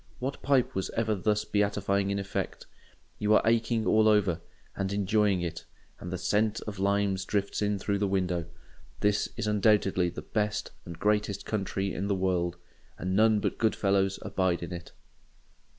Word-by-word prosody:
What 135 +2 -4
pipe 135 -3 +2
was 95 - -2
ever 110 -1 +1
thus 105 +1 0
beatifying 100 -1 +1
in 100 - 0
effect? 100 0 -4 0.5
You 105 +1 +3
are - - +5
aching 115 0 +2
all 110 0 +4
over, 100 -6 +3 0.3
and 95 0 -2
enjoying 100 -1 +2
it; 85 - -4 0.4
and 90 - -7
the 95 - -2
scent 105 +3 +1
of 105 -3 -6
the - - -5
limes 100 -1 +1
drifts 100 +1 -1
in 105 0 +1
through 100 +1 -1
the 100 - +1
window. 90 -3 0 0.6
This 105 0 +2
is - - -2
undoubtedly 105 -4 +3
the - - -8
best 105 -1 -2
and 85 -2 -8
greatest 105 0 0
country 100 -2 -2
in 100 +2 -2
the 100 - +1
world; 90 -2 0 0.4
and 95 +1 -2
none 110 0 +4
but - - -2
good 110 -2 +2
fellows 95 -1 +1
abide 90 -2 0
in 85 - -5
it. 85 -1 -8
100 Hz, 175 wpm, -29 LUFS, 95-105 Hz, 0.6 s, are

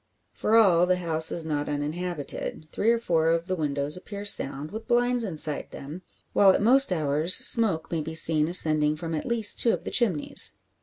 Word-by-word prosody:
For 220 - -1
all, 180 -6 +4
the 185 - +2
house 160 -3 -2
is 165 - -1
not 150 -2 -3
uninhabited. 155 +1 -5
Three 220 - -1
or 235 - +3
four 165 -8 0
of 165 0 0
the 185 0 -3
windows 145 -2 0
appear 200 +2 -7
sound, 145 -6 +1
with 220 +1 -8
blinds 245 0 +1
inside 155 -6 -3
them; 150 +6 -10 0.3
while 200 - +5
at 190 - +3
most 255 +3 +4
hours 155 +1 0
smoke 210 -9 0
may 165 -2 -2
be 160 +1 -7
seen 155 -1 +2
ascending 155 -3 +2
from 165 +1 -6
at 155 - -4
least 230 -3 +2
two 230 - +3
of - - -5
the - - -6
chimneys. 195 -12 +1
170 Hz, 195 wpm, -25 LUFS, 155-205 Hz, 0.3 s, while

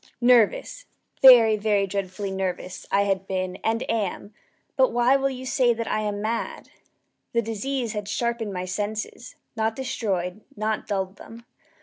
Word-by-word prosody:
nervous 250 - +3 0.3
very, 235 -5 +9
very 205 -1 +1
dreadfully 195 0 -4
nervous 185 -1 -4
I 200 - +4
had 195 -1 -1
been 185 -1 -2
and 225 +3 -1
am; 210 -2 -2 0.4
but - - +4
why 245 +2 +3
will 275 0 +1
you 260 -1 -7
say 250 -3 +2
that 230 0 -4
I - - 0
am 205 -1 -3
mad? 230 +2 -3 0.6
The 235 - +3
disease 230 +2 -3
had 210 -2 -4
sharpened 235 0 -2
my 185 -1 -4
senses 210 +5 -4 0.2
not 220 0 0
destroyed 200 -7 -3
not 215 +1 -2
dulled 190 -1 -2
them. 230 +1 -12
215 Hz, 150 wpm, -25 LUFS, 195-235 Hz, 0.6 s, very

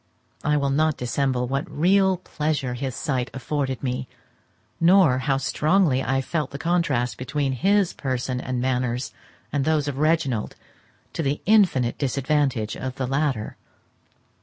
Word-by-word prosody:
I 150 0 +2
will 140 -1 0
not 155 +1 +2
dissemble 125 0 -1
what 135 +3 -2
real 190 +4 +3
pleasure 150 -6 -2
his 130 0 -4
sight 130 -5 -2
afforded 135 -1 -2
me, 125 -1 -2 0.7
nor 170 -6 +5
how 135 0 +1
strongly 150 +1 +2
I 135 0 0
felt 150 +1 -2
the 140 - -7
contrast 145 -7 0
between 140 +1 -1
his 195 - +2
person 130 -1 -2
and 130 -1 -3
manners 125 0 -1 0.4
and 140 -1 0
those 155 -1 +1
of 140 -1 -3
Reginald, 155 -8 +1 0.6
to - - -2
the 140 -1 -1
infinite 180 - +3
disadvantage 135 -4 0
of 130 0 -5
the 130 - -2
latter. 135 -4 -1
140 Hz, 140 wpm, -24 LUFS, 130-155 Hz, 0.7 s, nor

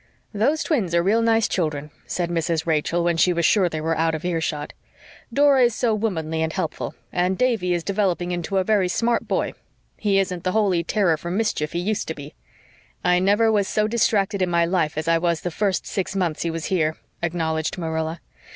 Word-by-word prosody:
"Those 270 +10 +1
twins 205 - 0
are 170 - +3
real 215 +5 +3
nice 225 -1 +3
children," 150 -4 -2 0.2
said 175 -1 -2
Mrs. 165 -1 -1
Rachel, 165 +1 +1
when 170 -1 +1
she 180 +2 +4
was 170 -1 0
sure 190 -2 +4
they 160 - -4
were 165 +1 0
out 160 0 +1
of 160 - -6
earshot. 160 -4 -2 0.6
"Dora 280 +1 +4
is 235 -2 0
so 235 -3 +1
womanly 160 -7 -2
and 160 0 0
helpful, 160 - -4 0.2
and 180 +1 +1
Davy 230 -8 +1
is 170 - -3
developing 190 -3 0
into 175 +2 -2
a 190 - +3
very 200 -2 +2
smart 230 +5 0
boy. - - -1 0.4
He 205 -2 +1
isn't 185 -3 -1
the 185 - 0
holy 195 -6 +2
terror 170 -2 +1
for 170 - -6
mischief 180 -6 -1
he 170 - -1
used 205 +4 -1
to 160 - -4
be." 145 0 -10 0.7
"I 180 0 +3
never 205 +4 +3
was 205 -2 +2
so 215 0 +1
distracted 205 -3 +1
in 185 - +1
my 170 -1 +3
life 170 -4 0
as 155 +1 -2
I 165 0 +3
was 170 -1 0
the 175 - -3
first 195 +1 -1
six 195 0 -3
months 175 -5 -1
he 170 - -1
was 165 -1 -4
here," 160 -4 0 0.2
acknowledged 160 -1 -1
Marilla. 160 -1 -3
180 Hz, 205 wpm, -23 LUFS, 165-205 Hz, 0.7 s, she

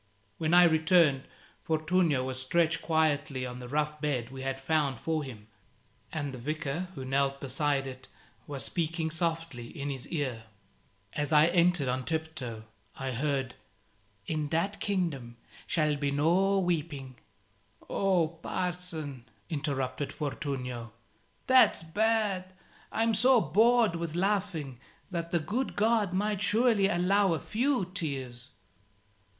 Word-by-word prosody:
When 160 +1 +2
I 180 - +9
returned, 160 -4 +4 0.4
Fortunio 160 -3 +1
was 130 0 -3
stretched 165 +4 +1
quietly 150 -4 +1
on 125 0 -6
the 125 - -8
rough 150 +2 -1
bed 130 -5 -1
we 135 0 -7
had 135 0 -3
found 140 -3 0
for 160 -2 -1
him, 110 -6 -10 0.6
and 145 -4 -3
the 130 - -7
Vicar, 155 +5 -3
who 130 - -6
knelt 140 +1 +1
beside 140 +1 0
it, 130 -1 -8 0.4
was 140 -2 -4
speaking 165 -1 -1
softly 165 -7 -2
in 140 +3 -5
his 135 -2 -6
ear. 130 -8 -3 0.7
As 150 0 -2
I 150 0 +7
entered 175 -4 +3
on 130 +1 -1
tiptoe, 155 -8 -4 0.3
I 135 -1 -3
heard 135 0 -1 0.4
"... 100 -1 -38
in 155 -2 -2
that 180 +6 -1
kingdom 160 - -2 0.3
shall 155 -3 +2
be 140 0 -1
no 175 +8 +3
weeping 150 -8 -2 0.4
" 105 +2 -30
"Oh, 185 -4 +2
Parson," 165 -5 -4 0.3
interrupted 140 -2 -2
Fortunio, 125 -6 -4 0.5
"that's 260 -9 +5
bad. 195 +1 0 0.4
I'm 225 +1 +1
so 250 +4 +5
bored 220 - +4
with 165 -1 -4
laughing 180 - -1 0.3
that 170 -2 -3
the 170 - +1
good 235 +11 -2
God 215 -2 +2
might 205 +2 0
surely 220 -2 +4
allow 195 +1 +3
a 160 - -1
few 245 - 0
tears." 140 -9 -5
155 Hz, 135 wpm, -30 LUFS, 135-180 Hz, 0.7 s, I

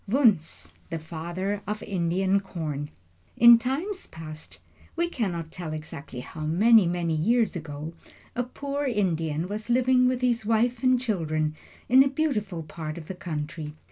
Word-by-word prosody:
WUNZH, 215 - +2 0.2
THE 165 - -2
FATHER 175 +5 -4
OF 210 +1 -3
INDIAN 190 +1 +1
CORN 155 -7 -4 0.5
|IN 235 0 +9
time 265 +8 -1 0.2
past 155 -1 -9 0.4
we 340 +1 +1
cannot 175 - -3
tell 170 -3 -5
exactly 150 -4 -7
how 155 - -9
many, 195 +6 +5
many 170 -1 0
years 220 +6 +2
ago 155 -1 -6 0.4
a 245 - +1
poor 280 +3 -3
Indian 170 - 0
was 210 +3 -5
living 250 +1 +4
with 250 0 0
his 245 -2 +1
wife 230 +2 +1
and 255 -1 +4
children 155 -10 -1 0.3
in 260 +2 +7
a - - +1
beautiful 220 - -1
part 155 0 -6
of 160 -2 -9
the - - -3
country. 155 -3 -5
190 Hz, 150 wpm, -26 LUFS, 160-240 Hz, 0.5 s, |IN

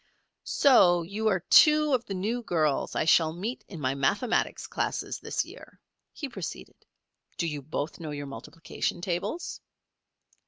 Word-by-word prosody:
"So 175 -11 +5
you 205 +6 -3
are 190 -4 +2
two 300 - +6
of 245 -2 +1
the 195 - -5
new 220 +6 -2
girls 155 -9 0
I - - +1
shall 160 -1 +4
meet 210 +9 -5
in 175 - -9
my 130 -2 0
mathematics 200 - 0
classes - - -3
this - - -2
year," - - -14 0.3
he 290 - -6
proceeded. 195 - -8 0.5
"Do - - -1
you 150 -3 -3
both 150 +3 -4
know 160 -2 -6
your 145 -1 -5
multiplication 165 +4 -5
tables?" 175 - -3
175 Hz, 150 wpm, -28 LUFS, 155-230 Hz, 0.5 s, two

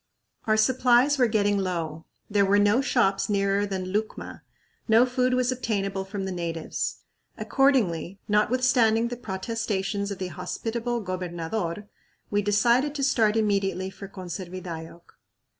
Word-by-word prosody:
Our 215 -1 +2
supplies 255 +4 +4
were 250 - +5
getting 205 -2 +1
low. 165 -4 -3 0.2
There 205 -1 +2
were 200 +1 +3
no 205 +5 +4
shops 200 -8 +1
nearer 200 0 +1
than 185 -1 -4
Lucma; 215 +1 -3 0.5
no 225 +2 +6
food 255 0 +1
was 255 0 +1
obtainable 195 -6 -2
from 195 0 -5
the 190 - -3
natives. 170 -3 -4 0.3
Accordingly, 200 - +1
notwithstanding 230 +1 +3
the 245 - -4
protestations 200 -1 -3
of 200 - -4
the 185 -1 -4
hospitable 235 - -3
gobernador, 180 +1 -4 0.4
we 205 0 +2
decided 235 +8 +2
to 280 - -2
start 225 -5 +3
immediately 195 -3 0
for 195 - -9
Conservidayoc. 175 -3 -7
205 Hz, 130 wpm, -26 LUFS, 190-235 Hz, 0.5 s, no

